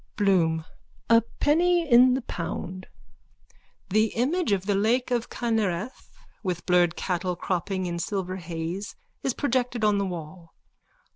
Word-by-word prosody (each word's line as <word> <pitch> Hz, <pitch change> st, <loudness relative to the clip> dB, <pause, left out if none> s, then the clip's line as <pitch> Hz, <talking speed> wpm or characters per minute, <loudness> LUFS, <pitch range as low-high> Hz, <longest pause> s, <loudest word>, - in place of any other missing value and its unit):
BLOOM: 170 Hz, -6 st, +2 dB, 0.5 s
A 230 Hz, 0 st, +7 dB, 0.2 s
penny 340 Hz, +3 st, +3 dB
in 250 Hz, 0 st, +6 dB
the 260 Hz, -, -3 dB
pound. 185 Hz, +1 st, -5 dB, 1.0 s
_(The 215 Hz, +2 st, +3 dB
image 285 Hz, -, +1 dB
of 195 Hz, -2 st, +1 dB
the 205 Hz, -, +1 dB
lake 230 Hz, +6 st, +1 dB
of 240 Hz, -1 st, 0 dB
Kinnereth 220 Hz, -2 st, -2 dB, 0.3 s
with 180 Hz, -4 st, -3 dB
blurred 175 Hz, -2 st, +3 dB
cattle 180 Hz, -1 st, -2 dB
cropping 185 Hz, +1 st, -2 dB
in 170 Hz, -1 st, -3 dB
silver 185 Hz, 0 st, -3 dB
haze 170 Hz, +3 st, -5 dB, 0.3 s
is 265 Hz, -, -1 dB
projected 250 Hz, -4 st, 0 dB
on 210 Hz, -1 st, +3 dB
the 200 Hz, -, 0 dB
wall. 165 Hz, -1 st, -8 dB
200 Hz, 135 wpm, -26 LUFS, 180-240 Hz, 1.0 s, A